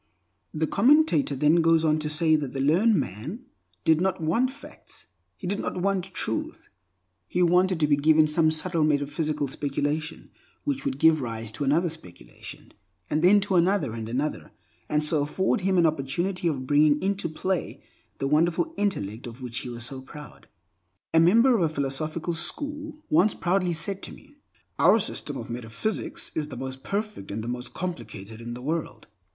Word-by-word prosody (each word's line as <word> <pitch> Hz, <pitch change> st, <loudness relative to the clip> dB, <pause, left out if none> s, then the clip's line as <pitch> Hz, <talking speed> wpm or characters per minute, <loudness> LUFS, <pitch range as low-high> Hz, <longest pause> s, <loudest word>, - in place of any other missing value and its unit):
The 155 Hz, +1 st, -1 dB
commentator 290 Hz, -, +3 dB
then 150 Hz, +5 st, +3 dB
goes 165 Hz, 0 st, +3 dB
on 155 Hz, 0 st, +2 dB
to 150 Hz, 0 st, -3 dB
say 155 Hz, +1 st, +3 dB
that 145 Hz, -4 st, -2 dB
the 135 Hz, -, -3 dB
learned 175 Hz, +11 st, +3 dB
man 145 Hz, -, -4 dB, 0.4 s
did 160 Hz, 0 st, +3 dB
not 190 Hz, 0 st, 0 dB
want 200 Hz, +11 st, +1 dB
facts; 280 Hz, +2 st, -12 dB, 0.3 s
he -, -, -9 dB
did 200 Hz, +3 st, -1 dB
not -, -, -3 dB
want 190 Hz, -1 st, 0 dB
Truth. 110 Hz, -, -4 dB, 0.6 s
He 180 Hz, -, +1 dB
wanted 180 Hz, 0 st, +3 dB
to 155 Hz, -, +3 dB
be 145 Hz, -1 st, +3 dB
given 155 Hz, +2 st, +5 dB
some 155 Hz, +1 st, +3 dB
subtle 160 Hz, +1 st, +1 dB
metaphysical 150 Hz, 0 st, 0 dB
speculation 145 Hz, +3 st, -3 dB, 0.3 s
which 280 Hz, -1 st, -2 dB
would 275 Hz, -1 st, -1 dB
give 160 Hz, -2 st, +4 dB
rise 115 Hz, -2 st, -5 dB
to 130 Hz, +7 st, -5 dB
another 155 Hz, +6 st, +2 dB
speculation, 90 Hz, -, -9 dB, 0.4 s
and 150 Hz, -, +1 dB
then 190 Hz, +4 st, +6 dB
to 200 Hz, -1 st, -2 dB
another 180 Hz, -, +2 dB
and 110 Hz, -1 st, -5 dB
another, 140 Hz, +6 st, -3 dB, 0.4 s
and 150 Hz, 0 st, +1 dB
so 150 Hz, 0 st, +2 dB
afford 190 Hz, +7 st, 0 dB
him 190 Hz, 0 st, +1 dB
an 170 Hz, -, +5 dB
opportunity 165 Hz, +5 st, -1 dB
of 135 Hz, -5 st, -2 dB
bringing 145 Hz, +1 st, +4 dB
into 195 Hz, -2 st, -1 dB
play 185 Hz, +3 st, -3 dB, 0.3 s
the 135 Hz, -, -2 dB
wonderful 170 Hz, -, +1 dB
intellect 115 Hz, -, -2 dB
of 120 Hz, +2 st, -10 dB
which 120 Hz, -2 st, -3 dB
he 125 Hz, -, -6 dB
was 120 Hz, -1 st, -4 dB
so 130 Hz, +1 st, -5 dB
proud. 150 Hz, +3 st, -12 dB, 0.7 s
A 165 Hz, -, +6 dB
member 230 Hz, +10 st, +5 dB
of 215 Hz, -, +1 dB
a 165 Hz, -, +2 dB
philosophical 155 Hz, +4 st, -2 dB
school 290 Hz, -, -3 dB
once 180 Hz, +7 st, +4 dB
proudly 180 Hz, 0 st, 0 dB
said 190 Hz, +5 st, -2 dB
to -, -, -7 dB
me, -, -, -16 dB, 0.4 s
"Our -, -, +6 dB
system -, -, -3 dB
of -, -, -7 dB
metaphysics 120 Hz, -, -3 dB
is 155 Hz, -2 st, -2 dB
the 135 Hz, -, -8 dB
most 130 Hz, +1 st, -6 dB
perfect 205 Hz, -, -4 dB
and 110 Hz, +2 st, -4 dB
the -, -, -6 dB
most 125 Hz, +1 st, -5 dB
complicated 110 Hz, -, -6 dB
in 120 Hz, +1 st, -6 dB
the 125 Hz, -, -9 dB
world." 160 Hz, +3 st, -3 dB
155 Hz, 180 wpm, -26 LUFS, 135-185 Hz, 0.7 s, then